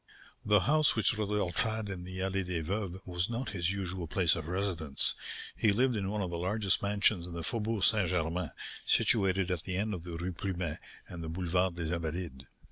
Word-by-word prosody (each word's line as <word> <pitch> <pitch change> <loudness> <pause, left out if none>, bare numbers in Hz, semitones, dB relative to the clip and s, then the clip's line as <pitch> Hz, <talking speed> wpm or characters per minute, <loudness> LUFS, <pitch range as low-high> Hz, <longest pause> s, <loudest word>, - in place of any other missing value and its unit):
The 105 -2 +5
house 150 - +4
which 110 0 +3
Rodolph 105 -4 -1
had 110 -1 0
in 95 -3 -5
the 95 0 -7
Allée 95 0 0
des 90 -3 -2
Veuves 95 +1 -2
was 90 +1 -1
not 120 +3 -2
his 90 -3 0
usual 95 -3 -3
place 85 -2 +3
of 80 -2 -5
residence; 85 -6 +1 0.4
he 105 - +3
lived 125 +4 +3
in 100 -2 -1
one 105 0 -1
of 90 - -3
the 85 - -2
largest 100 +2 +1
mansions 100 -3 +2
in 90 - -7
the 85 -1 -4
Faubourg 110 -1 -1
St. 105 -6 +4
Germain, 85 -1 0 0.3
situated 95 -3 +3
at 90 -3 0
the 90 +1 -3
end 105 +2 0
of 90 -4 -5
the 85 -1 -5
Rue 90 +2 -3
Plumet 85 -3 -3 0.3
and 85 -2 -7
the 80 - -4
Boulevard 90 +1 +1
des 85 -1 -2
Invalides. 80 -4 -3
95 Hz, 205 wpm, -32 LUFS, 85-100 Hz, 0.4 s, The